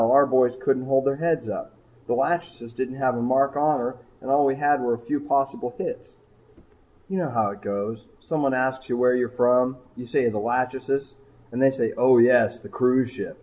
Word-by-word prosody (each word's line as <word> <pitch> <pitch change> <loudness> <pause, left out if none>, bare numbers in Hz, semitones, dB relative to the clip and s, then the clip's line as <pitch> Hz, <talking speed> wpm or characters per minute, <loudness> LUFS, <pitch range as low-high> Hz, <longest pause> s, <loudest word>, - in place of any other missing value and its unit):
Our 140 +1 +6
boys 130 -2 +2
couldn't 130 0 0
hold 135 0 +2
their 140 0 +1
heads 165 0 -1
up. 330 0 -6 0.3
The - - 0
'Lachesis' 170 -9 -2
didn't 130 +1 -4
have 130 -2 0
a 120 - -3
mark 135 +3 +1
on 150 +1 +2
her 125 +1 -4 0.2
and 130 - -5
all 140 +1 +4
we 135 -1 +2
had 145 -1 +1
was 120 -1 0
a 120 - -20
few 145 +4 -1
possible 140 -3 -1
hits. - - -6 0.9
You 190 -1 -3
know 170 -4 -2
how 110 -5 0
it 100 0 -12
goes 100 +2 -5
someone 145 -5 -1
asks 130 0 -2
where 125 0 +2
you're 125 -1 0
from. 125 +1 +2 0.2
You 125 - -9
say 120 - +1
the 105 -2 -3
'Lachesis' 130 +4 -2 0.4
and 120 +2 -3
they 135 - +6
say 135 -4 -2
'Oh, 125 0 +5
yes, 120 0 +4
the - - -11
cruise 125 0 +1
ship.' 130 - -8
130 Hz, 205 wpm, -24 LUFS, 125-140 Hz, 0.9 s, Our